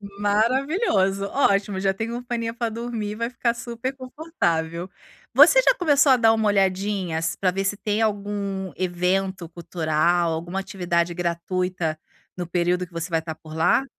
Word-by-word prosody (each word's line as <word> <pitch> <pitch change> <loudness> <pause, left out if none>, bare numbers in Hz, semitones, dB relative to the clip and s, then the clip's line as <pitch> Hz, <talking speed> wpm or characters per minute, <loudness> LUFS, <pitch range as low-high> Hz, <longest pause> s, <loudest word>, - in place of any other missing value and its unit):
Maravilhoso, 205 - +1
ótimo. 200 -6 +1
Já 195 0 +1
tem 225 +3 -4
companhia 240 -1 -3
pra 235 -1 -2
dormir, 225 -2 -4
vai 230 +2 -3
ficar 240 -1 0
superconfortável. 235 - -3 0.4
Você 300 - +7
já - - +4
começou 290 - +4
a - - +6
dar 225 -2 +4
uma 220 -1 +1
olhadinha 195 -3 0
s 165 0 -2
pra 185 - +2
ver 195 +2 -2
se 195 +1 0
tem 210 +1 -1
algum 200 -2 -2
evento 185 0 -1
cultural, 170 0 0
alguma 170 +4 -4
atividade 175 -3 -1
gratuita 175 -1 -2 0.4
no 175 -1 -4
período 180 +1 0
que 175 - -27
você 165 +2 -4
vai 165 -1 0
estar 160 0 -6
por 155 0 -12
lá? 170 +11 +3
195 Hz, 155 wpm, -23 LUFS, 175-230 Hz, 0.4 s, Você